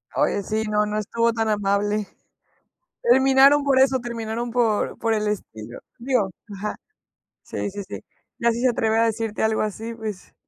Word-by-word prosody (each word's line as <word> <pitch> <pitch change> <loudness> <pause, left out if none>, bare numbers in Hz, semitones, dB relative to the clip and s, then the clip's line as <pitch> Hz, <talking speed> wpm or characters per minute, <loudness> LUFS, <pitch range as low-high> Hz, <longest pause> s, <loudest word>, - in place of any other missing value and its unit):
Oye, 200 - +1
sí, 215 +2 -2
no 210 0 +2
no 210 0 -3
estuvo 230 +2 0
tan 225 -1 -1
amable. 205 0 0 1.0
Terminaron 270 +3 +5
por 270 -2 +3
eso, 265 0 +4
terminaron 235 0 -4
por 230 -3 +1
por 225 0 0
el 210 0 -1
estilo. 120 - -6 0.2
Digo. 235 -6 0 0.3
Ajá. 210 +2 -4 0.7
Sí, 205 - -4
sí, 200 +1 -6
sí. - - -6 0.4
Ya 235 0 +2
si 235 - -4
se 255 - +3
atreve 225 -1 +1
a 230 - +4
decirte 225 -1 -2
algo 220 0 +2
así, 220 +2 -4
pues. 215 -5 -7
220 Hz, 165 wpm, -23 LUFS, 210-235 Hz, 1.0 s, Terminaron